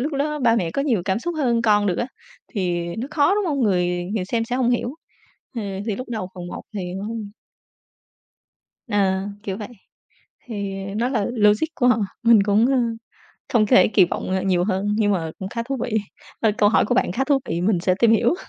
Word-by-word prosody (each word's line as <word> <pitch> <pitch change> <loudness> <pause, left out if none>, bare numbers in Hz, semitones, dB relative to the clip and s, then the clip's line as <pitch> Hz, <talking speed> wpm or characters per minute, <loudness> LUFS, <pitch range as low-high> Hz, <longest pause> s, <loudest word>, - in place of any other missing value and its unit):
lúc 290 +4 -2
đó 300 +2 -1
ba 235 -4 +3
mẹ 170 -6 0
có 275 - -1
nhiều 235 -11 +1
cảm 190 +2 0
xúc 345 +7 -4
hơn 240 -6 +1
con 210 -2 +3
được 180 -3 0
á, 240 - 0 0.5
thì 175 -5 -1
nó 235 +4 -3
khó, 305 +5 +3
đúng 415 - 0
không? 290 -4 -1
Người 180 -5 +1
người 195 - -1
xem 230 +4 -1
sẽ 245 +2 -2
hông 245 -2 +2
hiểu, 245 +2 -1 0.6
ờ, 230 - -2 0.2
thì 215 -3 -1
lúc 255 0 -7
đầu 215 -5 -3
phần 180 -1 -7
1 - - -7
thì 180 -3 -4
hông 225 -3 -5 1.6
À, 195 -1 +1
kiểu 195 -2 -4
vậy, 210 +1 -6 0.8
thì, 200 -4 -4 0.2
ờ, 195 - -6
nó 240 +3 +1
là 220 -6 0
logic 210 +3 +3
của 250 - +2
họ, 245 - +4 0.3
mình 230 -4 +6
cũng, 210 +3 +3
ơ, 270 0 +2 0.8
không 220 -3 +4
có - - -11
thể 185 - +6
kỳ 200 -3 +5
vọng, - - -4
ờ, 190 0 0
nhiều 180 -2 +2
hơn, 190 0 -1
nhưng 205 -2 +2
mà 165 -4 -1
cũng 190 - -5
khá 230 +1 -3
thú 270 +1 -2
vị. 220 -2 0 0.4
Thôi 220 -2 +4
câu 205 - +5
hỏi 215 - +3
của 245 - +1
bạn 235 -7 +1
khá 265 +7 0
thú 280 0 +3
vị, 170 - -1
mình 185 -1 +1
sẽ 185 +1 +2
tìm 235 - +4
hiểu. 230 +7 +3
215 Hz, 225 wpm, -22 LUFS, 190-245 Hz, 1.6 s, mình